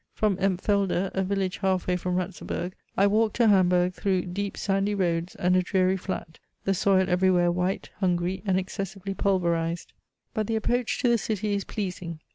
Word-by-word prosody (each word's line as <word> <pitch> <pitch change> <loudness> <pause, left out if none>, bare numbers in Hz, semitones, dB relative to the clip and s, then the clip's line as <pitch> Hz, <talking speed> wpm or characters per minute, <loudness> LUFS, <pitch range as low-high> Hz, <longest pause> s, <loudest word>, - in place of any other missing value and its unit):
From 210 -3 +2
Empfelde, 195 0 +1
a 190 - 0
village 190 -1 -1
half 190 -2 0
way 180 - +1
from 180 0 -2
Ratzeburg, 180 0 -3 0.2
I 195 - +5
walked 215 +1 +2
to 235 -2 +4
Hamburg 180 -2 +4
through 185 -1 0
deep 195 +2 -4
sandy 195 +1 0
roads 175 -2 -1
and 180 +1 +2
a 185 - +4
dreary 185 0 +2
flat: 185 -4 -5 0.2
the 195 - +1
soil 190 0 +3
everywhere 180 -1 +3
white, 180 +2 -2
hungry, 180 -1 0
and 190 -3 +1
excessively 195 +1 -4
pulverised; 170 -4 0 0.4
but 215 -1 -1
the 225 - 0
approach 240 +2 0
to - - +2
the 235 -1 +3
city 210 -1 -2
is 200 -1 -1
pleasing. 180 -5 -4
190 Hz, 175 wpm, -26 LUFS, 180-200 Hz, 0.4 s, I